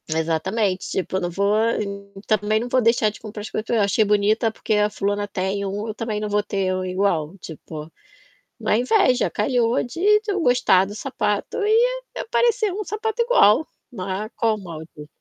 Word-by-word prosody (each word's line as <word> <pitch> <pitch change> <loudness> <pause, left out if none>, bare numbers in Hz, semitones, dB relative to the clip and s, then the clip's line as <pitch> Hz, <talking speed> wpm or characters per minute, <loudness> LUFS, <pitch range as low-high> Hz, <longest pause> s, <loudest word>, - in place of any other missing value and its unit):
Exatamente, 170 +5 -1
tipo, 190 0 -2
eu - - -2
não 175 - -1
vo 195 +3 -2 0.8
também 215 0 +2
não 240 - -4
vou 255 +1 +2
deixar 230 -1 +3
de - - -13
comprar 215 -1 -8
as 210 - -7
coisas 215 - -3
que - - -6
eu 235 - +2
achei 200 +2 +3
bonita 210 +2 +2
porque 220 - -3
a 210 0 +3
fulana 205 0 -2
tem 195 0 -2
um, 205 +3 -3
eu - - -3
também 220 -1 -3
não 210 - -3
vou 205 0 +2
ter 195 -2 -1
um 185 - -2
igual, 185 -3 -1
tipo. 160 -2 -9 0.7
Não - - -3
é 215 - +4
inveja, 255 - +3
calhou 240 -2 +1
de 245 +8 -7 0.2
de 430 -1 -5
eu 385 - -1
gostar 245 - +4
do 205 - -8
sapato 210 -4 -2
e 470 +4 +2
aparecer 465 -3 +1
um 420 +3 -4
sapato 440 +3 -3
igual, 315 - +4 0.3
né, 195 0 -4
qual 225 -1 +1
o 210 - -10
mal 165 -4 -8 0.2
disso? 150 0 -10
210 Hz, 195 wpm, -22 LUFS, 195-245 Hz, 0.8 s, é